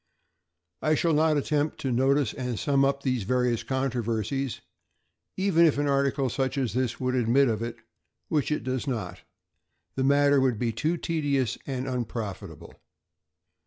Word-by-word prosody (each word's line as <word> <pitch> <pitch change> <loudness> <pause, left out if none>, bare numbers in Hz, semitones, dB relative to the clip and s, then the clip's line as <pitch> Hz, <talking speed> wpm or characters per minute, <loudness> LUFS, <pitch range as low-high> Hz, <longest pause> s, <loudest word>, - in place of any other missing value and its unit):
I 155 0 +2
shall 165 +1 +1
not 155 0 +3
attempt 145 +1 -1
to 135 - -1
notice 135 0 +2
and 125 -3 -4
sum 140 +2 +2
up 140 0 +1
these 130 -3 0
various 125 +2 0
controversies; 125 -1 -2 0.8
even 190 -3 +3
if 145 - +1
an 145 - +1
article 140 -1 +1
such 135 +2 -2
as 130 -5 -1
this 125 -2 -1
would 125 0 -1
admit 130 +2 +3
of 110 -2 -1
it, 115 0 -4 0.5
which 150 -1 0
it 150 - -1
does 130 +2 -3
not, 100 -9 -3 0.7
the 130 - -1
matter 140 0 +4
would 130 -4 +1
be 115 +1 0
too 155 +10 -1
tedious 145 -7 0
and 130 -1 -3
unprofitable. 115 -5 -5
130 Hz, 155 wpm, -27 LUFS, 120-140 Hz, 0.8 s, matter